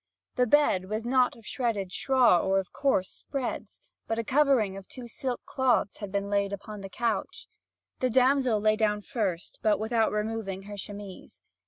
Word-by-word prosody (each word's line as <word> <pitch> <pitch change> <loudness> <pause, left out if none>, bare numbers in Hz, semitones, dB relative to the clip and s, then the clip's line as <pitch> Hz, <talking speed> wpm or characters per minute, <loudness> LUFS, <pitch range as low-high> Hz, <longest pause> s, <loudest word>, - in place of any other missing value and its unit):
The 250 - +2
bed 215 -9 +3
was 215 +2 -3
not 250 0 +3
of 230 - -17
shredded 215 -8 -2
straw 255 -6 +4
or 195 +2 +1
of 190 - -6
coarse 265 -10 +1
spreads. 270 -4 -5 0.3
But 225 - -1
a 230 - 0
covering 260 -6 +3
of 195 -1 -9
two 250 -2 -9
silk 250 +2 -3
cloths 250 -6 +1
had 205 -2 -6
been 200 0 -1
laid 200 -1 0
upon 205 +1 -7
the 195 - -7
couch. 225 -2 -2 0.5
The 255 - +1
damsel 255 -2 +3
lay 215 +1 +3
down 210 -1 0
first, 195 -9 -3
but 215 -1 +2
without 225 0 +1
removing 210 -3 -3
her 205 +1 -8
chemise. 200 -1 -9
215 Hz, 175 wpm, -28 LUFS, 200-250 Hz, 0.5 s, straw